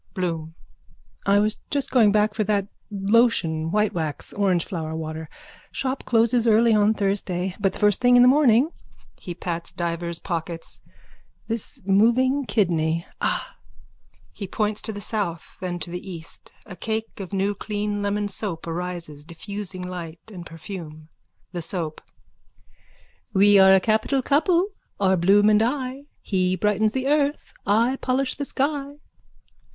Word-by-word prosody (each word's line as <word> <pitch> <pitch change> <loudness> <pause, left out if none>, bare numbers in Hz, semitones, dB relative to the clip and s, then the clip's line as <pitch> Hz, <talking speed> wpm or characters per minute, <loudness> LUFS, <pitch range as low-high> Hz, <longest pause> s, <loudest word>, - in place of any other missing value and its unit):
BLOOM: 165 -3 -3 0.7
I 200 +1 +5
was 210 +1 +1
just 280 -1 -2
going 225 -5 +5
back 210 0 +2
for 215 - 0
that 200 -1 +1 0.2
lotion 195 -6 +2
whitewax, 175 -6 -1
orangeflower 175 -4 -1
water. 160 0 -5 0.4
Shop 265 0 -3
closes 235 0 +3
early 225 +1 +5
on 210 +1 +4
Thursday. 190 -2 -1
But 195 -2 +1
the - - -8
first 210 +1 +2
thing 245 0 +5
in 245 - +8
the - - +7
morning. 270 +1 +5 0.5
(He 175 - -7
pats 170 -1 -4
divers 170 0 -2
pockets.) 170 -1 -5 0.7
This 230 -1 -3
moving 240 +8 +3
kidney. 165 -5 +1 0.2
Ah! - - -1 0.8
(He 200 - -6
points 210 +2 -1
to - - -3
the 205 -1 -7
south, 200 -7 -4
then 180 -1 -3
to 175 - -6
the 180 +2 -6
east. 165 -2 -9
A 195 - -9
cake 220 +2 -4
of 195 -1 -6
new 195 +1 0
clean 205 0 -3
lemon 205 0 0
soap 195 -4 -3
arises, 170 -3 -5
diffusing 185 +3 -6
light 175 +2 -8
and 175 -3 -8
perfume.) 160 -2 -9 0.4
THE 175 -2 -4
SOAP: 160 -2 -2 1.3
We're 195 -1 +7
a - - +5
capital 220 +7 +1
couple 335 +8 +2 0.3
are 190 -1 +3
Bloom 195 +4 +4
and 215 0 +5
I. 260 +3 -2 0.2
He 185 -2 +1
brightens 210 +3 +1
the 260 0 -2
earth. 290 +1 0
I 230 +6 +3
polish 260 +1 0
the 285 - -4
sky. 280 +1 -2
200 Hz, 145 wpm, -24 LUFS, 175-225 Hz, 1.3 s, in